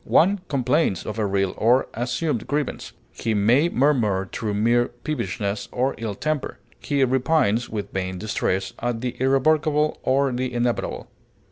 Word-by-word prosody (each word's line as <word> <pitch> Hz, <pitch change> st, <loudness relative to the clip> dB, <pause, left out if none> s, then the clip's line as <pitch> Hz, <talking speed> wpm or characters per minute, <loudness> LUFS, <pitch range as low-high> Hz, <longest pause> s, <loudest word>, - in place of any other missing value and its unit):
One 195 Hz, +5 st, +3 dB
complains 130 Hz, -, +1 dB
of 110 Hz, +1 st, -4 dB
a 105 Hz, -, +1 dB
real 95 Hz, -1 st, 0 dB
or 120 Hz, +4 st, +3 dB
assumed 125 Hz, +2 st, -2 dB
grievance; 145 Hz, -1 st, -3 dB, 0.2 s
he 115 Hz, -1 st, -2 dB
may 120 Hz, +11 st, +4 dB
murmur 115 Hz, -, +2 dB
through 105 Hz, -2 st, -2 dB
mere 120 Hz, +3 st, +3 dB
peevishness 110 Hz, -7 st, -4 dB
or 130 Hz, +2 st, 0 dB
ill 110 Hz, -3 st, -3 dB
temper; 155 Hz, +4 st, -2 dB, 0.2 s
he 140 Hz, -2 st, +1 dB
repines, 130 Hz, -3 st, +1 dB
with 105 Hz, -2 st, -5 dB
vain 95 Hz, -1 st, -2 dB
distress, 95 Hz, -1 st, -1 dB
at 120 Hz, -1 st, -2 dB
the 125 Hz, -1 st, -3 dB
irrevocable 150 Hz, +3 st, +2 dB
or 135 Hz, +1 st, +2 dB
the 125 Hz, +1 st, -2 dB
inevitable. 120 Hz, 0 st, -2 dB
120 Hz, 145 wpm, -23 LUFS, 105-140 Hz, 0.2 s, may